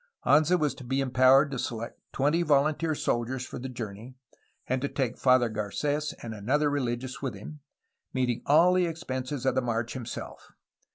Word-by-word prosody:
Anza 155 +5 +4
was 150 -2 +1
to - - -11
be 130 +2 -1
empowered 135 +2 +4
to 135 - -3
select 115 0 -5
twenty 150 +5 +1
volunteer 155 +1 +2
soldiers 125 0 -1
for - - -7
the 130 +2 -5
journey 115 0 -7 0.5
and 130 0 -1
to 140 - 0
take 130 -4 -2
Father 130 -2 +4
Garces 145 +8 -2
and 115 -2 -5
another 140 +8 +1
rehgious 130 -1 -3
with 130 -7 -3
him, 150 +10 -10 0.5
meeting 125 -3 -1
all 165 +5 +6
the 180 -1 +2
expenses 135 -5 -4
of 130 - +3
the 130 - +1
march 115 -1 -2
himself. 125 -3 -8
130 Hz, 170 wpm, -28 LUFS, 120-145 Hz, 0.5 s, all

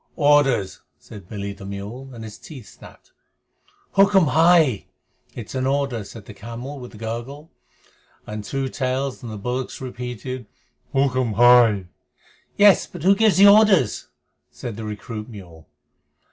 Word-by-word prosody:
"Orders," 145 - +2 0.2
said 100 -4 -14
Billy 100 -1 -5
the 100 - -13
mule, 100 +7 -8
and 115 -3 -10
his 110 -1 -10
teeth 135 -8 -12
snapped. - - -17 0.8
"Hukm 195 -4 +4
hai!" 160 - +3 0.5
(It 120 - -7
is - - -9
an 130 0 -1
order!), 135 -5 -1
said 100 +1 -12
the 105 - -11
camel 120 +7 -8
with 125 -2 -11
a - - -11
gurgle, 120 +8 -7 0.7
and 105 0 -6
Two 135 +4 -3
Tails 130 +1 -3
and 120 -3 -8
the 105 - -7
bullocks 125 +5 -4
repeated, 125 -1 -7 0.4
"Hukm 130 -4 0
hai!" 120 -4 +5 0.7
"Yes, 205 -1 +5
but 175 -4 -10
who 195 +2 +5
gives 215 -1 +3
the 195 - +7
orders?" 200 - +4 0.4
said 75 +10 -8
the 110 +1 -7
recruit 105 +1 -7
mule. 90 -7 -13
125 Hz, 145 wpm, -22 LUFS, 105-140 Hz, 0.8 s, the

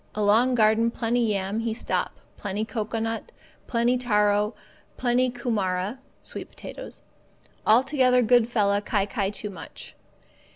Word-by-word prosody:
Along 215 +5 +3
garden 220 0 +4
plenty 235 +1 -1
yam 200 +1 -1
he 225 -1 -2
stop, - - -2 0.2
plenty 205 +1 -3
cocoanut, 225 - -3 0.4
plenty 240 +1 +2
taro, 210 -2 +2 0.4
plenty 250 +1 +2
kumara 210 -3 -2 0.2
(sweet - - -7
potatoes), - - -10 0.6
altogether 255 +1 +4
good 240 0 +4
fella 205 -4 +2
kai 205 -1 0
kai 200 -2 -1
too 210 0 -5
much. 175 -4 -10
225 Hz, 120 wpm, -25 LUFS, 205-245 Hz, 0.6 s, garden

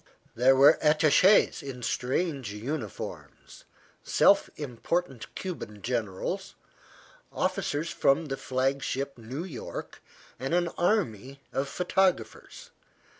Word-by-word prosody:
There 130 +3 +4
were 135 +2 +6
attaches, 155 +6 +4
in 125 -3 -8
strange 130 - -1
uniforms, 115 0 -7 0.4
self - - +4
important 140 0 -3
Cuban 105 - -6
generals, 115 -6 -3 0.8
officers 150 +4 -1
from 140 +4 +2
the 135 -2 -3
flagship 135 +1 -1
New 125 +7 -6
York, 160 -10 -7 0.4
and 135 +6 -1
an 175 -1 +1
army 140 - -1
of 140 +1 -1
photographers. 190 - -1
140 Hz, 95 wpm, -28 LUFS, 125-170 Hz, 0.8 s, were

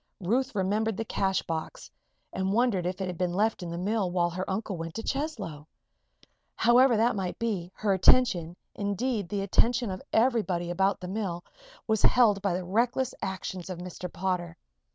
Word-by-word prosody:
Ruth 235 +7 0
remembered 205 +2 0
the 225 - -2
cash 190 -2 0
box 160 -1 -5 0.4
and 190 +1 -1
wondered 215 -6 +2
if 185 +1 -4
it - - 0
had 180 -2 -5
been 180 -1 0
left 215 +2 +1
in 175 - -5
the 170 - -4
mill 200 +1 0
while 175 -1 +1
her 185 +2 -4
uncle 195 0 -2
went 165 -1 -6
to 225 - -4
Cheslow? 220 - -4 0.9
However 240 +1 +5
that 235 +2 +3
might 190 -3 -3
be, 195 -7 -2
her 205 -2 +1
attention 185 -4 +4 0.2
indeed, 205 0 -2
the 200 -1 -1
attention 235 +3 +2
of 185 - -5
everybody 210 -8 +1
about 190 +2 +1
the 180 - -5
mill 185 -3 -3 0.4
was 220 -2 +1
held 220 -6 +5
by 195 -3 0
the 180 0 -3
reckless 235 +6 +1
actions 190 -1 -4
of 185 - -4
Mr. 180 0 -7
Potter. 175 -2 -2
195 Hz, 175 wpm, -28 LUFS, 180-225 Hz, 0.9 s, However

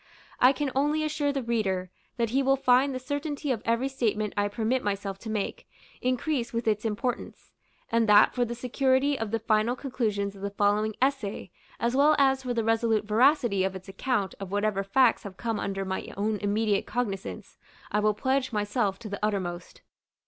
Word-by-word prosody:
I 255 - +7
can 280 -1 -2
only 295 +3 +1
assure 300 -2 0
the 275 -2 -2
reader, 195 -6 -1 0.3
that 230 -2 0
he 270 +3 +2
will 270 0 +3
find 270 0 +3
the 260 - -3
certainty 285 +2 -3
of 230 -4 -1
every 230 +3 +1
statement 220 -6 -1
I 205 -1 +1
permit 225 +5 -1
myself 200 -1 -3
to 225 - -8
make, 215 -2 -3 0.3
increase 255 0 -1
with 230 0 -3
its 210 0 +1
importance; 225 +3 -3 0.4
and 230 -1 +2
that, 205 0 +7
for 245 - +1
the 240 0 -3
security 260 +3 +1
of 225 -1 -2
the 225 - 0
final 220 +2 +1
conclusions 215 -7 -2
of 195 - -12
the 200 - -2
following 205 +1 +1
essay, 265 -7 -1 0.3
as 235 +2 0
well 295 +3 +5
as 270 -1 +3
for 250 -2 -3
the 230 - +1
resolute 225 -1 +1
veracity 230 -2 +3
of 190 0 -1
its 185 0 -9
account 200 0 -1
of 195 -2 -7
whatever 205 -1 0
facts 235 +4 +3
have 200 -4 -9
come 225 -3 -2
under 195 0 -3
my 190 0 -4
own 210 +1 0
immediate 205 0 0
cognizance, 210 -5 -4 0.3
I 210 - +2
will 210 0 +2
pledge 260 +3 0
myself 205 -1 0
to 230 - -7
the 200 0 -6
uttermost. 185 -4 -3
225 Hz, 190 wpm, -27 LUFS, 205-260 Hz, 0.4 s, I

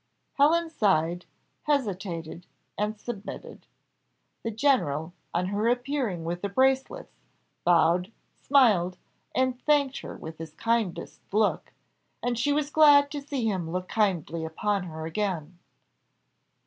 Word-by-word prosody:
Helen 325 +3 +3
sighed, 175 - +1 0.4
hesitated, 190 - -2 0.3
and 210 +1 -2
submitted. 215 -3 -8 0.7
The 230 - -3
general, 195 - +1 0.2
on 180 +2 -1
her 205 +3 0
appearing 245 - -1
with 175 +1 -3
the 200 - -2
bracelets, 265 +5 +1 0.5
bowed, 175 +2 +3 0.3
smiled, 205 -10 +4 0.4
and 255 -1 +1
thanked 285 -2 +2
her - - -8
with 160 0 -9
his 160 -1 -8
kindest 230 -5 -1
look; 210 +1 +1 0.5
and 245 0 0
she 290 +5 +2
was 295 0 0
glad 290 -2 +6
to 290 -2 -4
see 275 -4 -3
him 185 -6 -2
look 180 +2 -3
kindly 170 -7 0
upon 195 +4 -1
her 160 -2 -6
again. 175 -2 -3
210 Hz, 120 wpm, -27 LUFS, 175-265 Hz, 0.7 s, glad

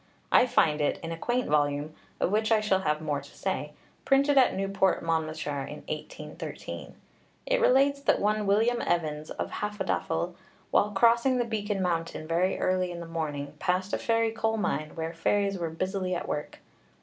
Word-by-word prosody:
I 255 - +6
find 155 -9 +3
it 145 - +1
in 165 - -4
a - - -2
quaint 245 +8 -1
volume 145 0 +1 0.3
(of - - +1
which 215 +2 +1
I 220 - +5
shall 210 -3 +2
have 150 -4 0
more 145 -2 -1
to 140 - -16
say), 150 -6 -3 0.3
printed 280 +1 +3
at 265 -2 +5
Newport, 195 -1 +1
Monmouthshire, 155 -3 -1
in - - -8
1813. - - -7 0.5
It - - +1
relates 280 - +4
that - - +3
one 210 0 +1
William 225 +4 +3
Evans, 155 -3 -1
of - - -4
Hafodafel, 190 -4 -2 0.4
while 210 - +4
crossing 235 +5 +4
the 240 - +1
Beacon 205 -3 -2
Mountain 165 -3 -2
very 175 +3 +1
early 185 0 +1
in 175 -1 -6
the 170 - -6
morning, 150 -4 -4
passed 185 +2 0
a - - +1
fairy 230 -1 +1
coal 225 0 0
mine, 155 -7 -2
where 165 0 -3
fairies 195 +3 +1
were 170 -1 -2
busily 185 +2 -2
at 175 - -4
work. 150 - -4
185 Hz, 175 wpm, -28 LUFS, 160-220 Hz, 0.5 s, I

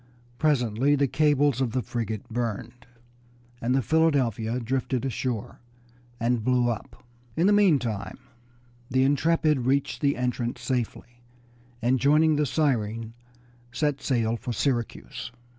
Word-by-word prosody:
Presently 135 -2 +2
the 140 0 +2
cables 145 -1 +2
of 120 -4 0
the 130 -2 0
frigate 110 -2 -4
burned, 120 +1 -4 0.7
and 125 +3 +1
the 135 - +1
Philadelphia 125 -7 +1
drifted 130 +1 -2
ashore 125 -3 -3 0.6
and 115 -1 0
blew 125 0 +2
up. 115 - -8 0.3
In 170 - +3
the 205 - +5
meantime 125 - +2 0.7
the 130 +1 +2
Intrepid 155 +1 +2
reached 140 +1 0
the 140 -3 +2
entrance 125 -1 -2
safely, 120 -1 -4 0.6
and 125 +2 +2
joining 150 +3 +4
the 150 0 +1
Siren 115 -6 -1 0.6
set 145 +1 -1
sail 115 -3 0
for 120 - -5
Syracuse. 120 0 -2
125 Hz, 125 wpm, -26 LUFS, 115-145 Hz, 0.7 s, the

